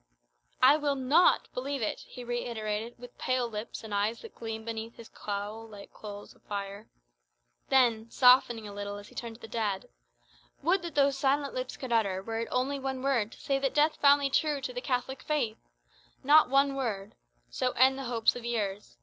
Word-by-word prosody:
"I 295 - +8
will 290 -2 0
not 275 +7 +4
believe 270 0 -3
it," - - -2
he 250 - -10
reiterated, 230 -2 -3
with 245 0 -13
pale 255 -1 0
lips, 215 0 -6
and 220 -2 -7
eyes 205 +3 0
that 455 - -10
gleamed 220 -1 -6
beneath 225 0 -5
his 230 - -12
cowl 210 +2 -5
like 205 -2 -12
coals 205 -1 -9
of - - -27
fire. 200 +1 -6 0.8
Then, 235 -4 +3
softening 245 -3 +5
a 205 - -8
little 205 0 -5
as 205 0 -11
he - - -17
turned 230 -1 -6
to 235 - -17
the - - -8
dead 210 -4 -2 0.7
"Would 360 +5 +3
that 340 -3 -7
those 280 -1 +3
silent 280 0 +1
lips 255 0 -4
could 255 -3 -4
utter, 195 -4 +1
were 225 +2 -3
it 230 - -2
only 270 +3 0
one 265 -1 -4
word, 240 -6 +1
to - - -15
say 275 -1 0
that 270 -1 -1
death 300 +1 +3
found 285 0 +5
thee 275 - 0
true 300 0 +1
to - - -4
the - - -4
Catholic 260 - -2
faith! 290 -8 -1 0.6
Not 300 +1 +6
one 275 +1 +3
word! 220 -8 -3 0.4
So - - 0
end 265 +2 +4
the 270 - -5
hopes 235 -2 +2
of 245 - -7
years. 210 -4 -3
240 Hz, 200 wpm, -29 LUFS, 220-275 Hz, 0.8 s, I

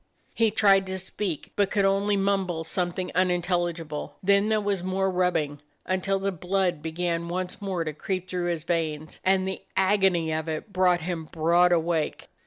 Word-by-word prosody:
He 225 -1 +3
tried 195 -2 +4
to 190 0 -3
speak, 185 -3 -4
but 200 -1 +2
could 200 -2 +2
only 200 +1 +2
mumble 195 -4 0
something 180 +2 -2
unintelligible. 175 -4 -1
Then 200 +2 +4
there 215 -1 +3
was 200 -3 -1
more 190 +1 0
rubbing, 160 -6 0 0.2
until 190 +1 0
the 195 +1 -1
blood 180 -2 -1
began 170 +1 -2
once 180 +3 -4
more 190 -4 -2
to 155 -1 -4
creep 185 +4 -3
through 180 -1 -2
his 165 -3 -2
veins, 160 -2 -2
and 190 0 +2
the 190 - -4 0.2
agony 190 -4 +3
of 160 +1 -2
it 160 +7 -5
brought 180 -2 +3
him 165 -1 -3
broad 170 +3 +3
awake. 165 -2 0
180 Hz, 170 wpm, -26 LUFS, 170-195 Hz, 0.2 s, tried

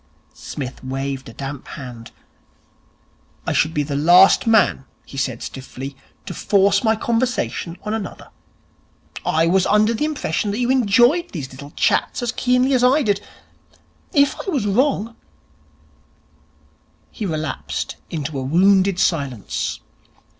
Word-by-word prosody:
Psmith 135 -2 -7
waved 135 0 -4
a - - -11
damp 135 +1 -7
hand. 120 -4 -9 1.4
'I - - -1
should 155 - +2
be 150 -2 0
the 140 0 -4
last 175 +9 +6
man,' 220 -11 +3 0.2
he - - -12
said 130 -3 -2
stiffly, 135 +1 -7 0.3
'to - - -6
force 200 +2 +2
my 220 -1 +3
conversation 230 -6 -1
on 210 - -3
another. 215 -4 -6 0.9
I 160 +1 +2
was 185 +2 +3
under 215 +2 +3
the 265 +7 -1
impression 275 - -2
that 200 - -2
you 245 +1 +1
enjoyed 255 - +3
these 145 -7 -5
little 140 +2 -10
chats - - +1
as 240 - 0
keenly 250 +2 +2
as 250 -1 +3
I 270 +4 +4
did. 205 -3 +1 0.9
If 285 -4 +3
I - - 0
was 275 - 0
wrong 230 +1 +1 0.9
' 75 +1 -37
He 210 - -4
relapsed 155 -5 -4
into 150 -3 -4
a - - -3
wounded 190 +6 +3
silence. 140 - -1
180 Hz, 140 wpm, -20 LUFS, 135-225 Hz, 1.4 s, last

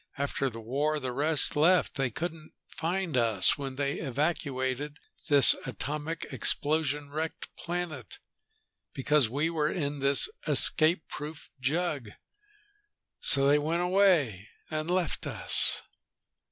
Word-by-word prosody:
After 140 -1 -2
the 115 -2 -10
war 145 +7 -2
the 130 -3 -4
rest 150 +4 +3
left. 170 +4 +2
They 135 -2 -2
couldn't 160 +4 -7
find 175 -1 -4
us 115 -6 +1
when 135 -2 -7
they 140 +1 -3
evacuated 140 -1 -3 0.3
this 140 -3 +8
atomic 150 +3 -5
explosion 150 -1 0
wrecked 155 +2 -6
planet, 170 - -6 0.8
because 140 -2 +1
we 145 +7 -2
were 155 -2 -1
in 145 -5 -4
this 140 +1 +4 0.2
escape 160 +1 +4
proof 150 +1 -9
jug. 145 -3 -2 1.1
So 140 -2 +5
they 145 +1 +4
went 165 +4 -1
away 175 - +1 0.2
and 155 +1 -3
left 180 -1 -2
us!" - - +2
150 Hz, 120 wpm, -28 LUFS, 135-160 Hz, 1.1 s, this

